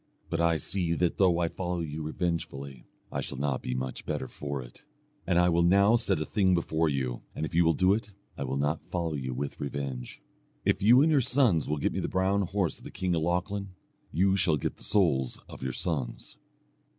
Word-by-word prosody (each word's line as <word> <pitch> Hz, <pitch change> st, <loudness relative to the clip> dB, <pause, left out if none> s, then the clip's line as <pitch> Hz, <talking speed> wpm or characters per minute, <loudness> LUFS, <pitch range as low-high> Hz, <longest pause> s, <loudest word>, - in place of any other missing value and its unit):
But 85 Hz, -, 0 dB
I 85 Hz, -1 st, +3 dB
see 85 Hz, 0 st, -1 dB
that 85 Hz, 0 st, 0 dB
though 90 Hz, -3 st, +4 dB
I 85 Hz, -1 st, +1 dB
follow 90 Hz, 0 st, -3 dB
you 80 Hz, -1 st, -4 dB
revengefully, 75 Hz, -5 st, -3 dB, 0.3 s
I -, -, -2 dB
shall -, -, -5 dB
not 70 Hz, -1 st, -1 dB
be 65 Hz, -, -3 dB
much 65 Hz, 0 st, -4 dB
better 65 Hz, -, -3 dB
for 70 Hz, -1 st, -5 dB
it, 60 Hz, -2 st, -11 dB, 0.4 s
and 85 Hz, -, +2 dB
I 90 Hz, 0 st, +5 dB
will 85 Hz, 0 st, +3 dB
now 100 Hz, +6 st, +5 dB
set 100 Hz, -7 st, +1 dB
a 80 Hz, -, -2 dB
thing 95 Hz, +2 st, +2 dB
before 80 Hz, -1 st, +1 dB
you, 65 Hz, -4 st, -2 dB
and 80 Hz, -, -2 dB
if 80 Hz, -, -7 dB
you 85 Hz, +1 st, +5 dB
will 80 Hz, 0 st, +4 dB
do 95 Hz, +5 st, +4 dB
it, 105 Hz, 0 st, -2 dB, 0.3 s
I -, -, -4 dB
will 65 Hz, 0 st, -2 dB
not 75 Hz, +3 st, 0 dB
follow 85 Hz, -3 st, -1 dB
you 65 Hz, -3 st, -3 dB
with 70 Hz, +2 st, -4 dB
revenge. 70 Hz, -3 st, -5 dB, 0.5 s
If -, -, +2 dB
you 120 Hz, +7 st, +7 dB
and 160 Hz, -, +3 dB
your 145 Hz, -3 st, +4 dB
sons 120 Hz, -, +2 dB
will 75 Hz, -, 0 dB
get 70 Hz, -, 0 dB
me -, -, -1 dB
the -, -, -1 dB
brown 95 Hz, +2 st, +1 dB
horse 95 Hz, -2 st, -1 dB
of -, -, -18 dB
the -, -, -8 dB
king 90 Hz, -1 st, -2 dB
of 80 Hz, -, +1 dB
Lochlann, 90 Hz, +3 st, -2 dB, 0.4 s
you 95 Hz, +2 st, +3 dB
shall 85 Hz, -5 st, +2 dB
get -, -, -3 dB
the -, -, -8 dB
souls 70 Hz, -, +2 dB
of -, -, -11 dB
your 65 Hz, -, -2 dB
sons." 65 Hz, -4 st, -3 dB
85 Hz, 225 wpm, -29 LUFS, 70-95 Hz, 0.5 s, you